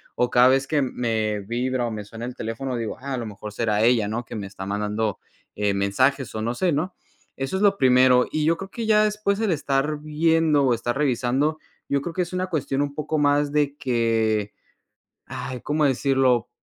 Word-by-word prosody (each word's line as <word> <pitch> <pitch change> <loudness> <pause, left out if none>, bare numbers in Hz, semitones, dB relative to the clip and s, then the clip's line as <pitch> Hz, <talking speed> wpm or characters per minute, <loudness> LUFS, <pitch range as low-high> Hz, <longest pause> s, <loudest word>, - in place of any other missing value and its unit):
O 125 0 0
cada 125 +1 +6
vez 135 +1 +3
que 150 0 +1
me 110 -4 -1
vibra 120 +4 -1
o 120 - -3
me 105 -1 -5
suena 115 +3 -8
el 125 0 -6
teléfono, 125 +4 -4
digo: 115 -3 -4
"Ah, 140 +1 -5
a - - -1
lo 115 -2 -4
mejor 105 0 -8
será 110 -1 0
ella", 115 -3 +3
¿no? 115 +3 -3
Que - - -8
me 100 -2 -5
está 95 -1 -8
mandando, 105 +1 -2 0.3
eh, 100 -1 0
mensajes 130 +6 +1
o 110 - -3
no 115 +2 -2
sé, 180 +3 +1
¿no? 160 +6 -2 0.4
Eso 135 +8 -3
es - - -3
lo 200 -1 +4
primero. 125 -1 +5
Y 155 -1 0
yo 165 +1 +2
creo 195 +2 -8
que 230 -2 -4
ya 215 -1 +5
después 210 -1 0
el 220 -3 +1
estar 145 -1 0
viendo 155 -1 +2
o 125 - +3
estar 120 +2 -2
revisando, 140 +3 0 0.3
yo 140 0 +1
creo 165 +4 -5
que 180 - -1
es 175 - -3
una 185 0 -1
cuestión 145 -5 -1
un 145 -1 -2
poco 155 +1 -2
más 145 0 +2
de 145 -1 +1
que, 115 -5 0 0.7
ay, 125 -1 -6
¿cómo 150 +3 0
decirlo? 130 -3 +2
130 Hz, 215 wpm, -24 LUFS, 115-150 Hz, 0.7 s, cada